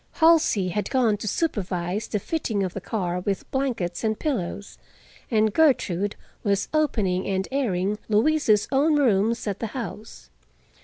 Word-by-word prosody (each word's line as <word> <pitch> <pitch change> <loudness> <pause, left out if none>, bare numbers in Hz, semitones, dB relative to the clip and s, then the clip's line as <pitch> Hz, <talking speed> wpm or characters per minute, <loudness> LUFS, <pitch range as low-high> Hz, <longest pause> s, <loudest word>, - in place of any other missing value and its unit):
Halsey 320 - +4
had 205 +4 -2
gone 245 -5 +2
to 210 - -6
supervise 195 - -2
the - - -1
fitting 215 - -2
of 185 -1 -3
the 200 - -5
car 180 -3 -2
with 195 +1 -3
blankets 240 -11 -2
and 220 -1 0
pillows, 205 - -3 0.5
and 220 -2 +2
Gertrude 205 - +2 0.3
was 200 -2 0
opening 210 -12 +1
and 190 -1 -1
airing 210 -6 0
Louise's 220 -1 +3
own 295 +3 +3
rooms 230 -4 +2
at 205 -2 -3
the 225 - -2
house. 220 -2 -8
210 Hz, 145 wpm, -24 LUFS, 190-265 Hz, 0.5 s, Halsey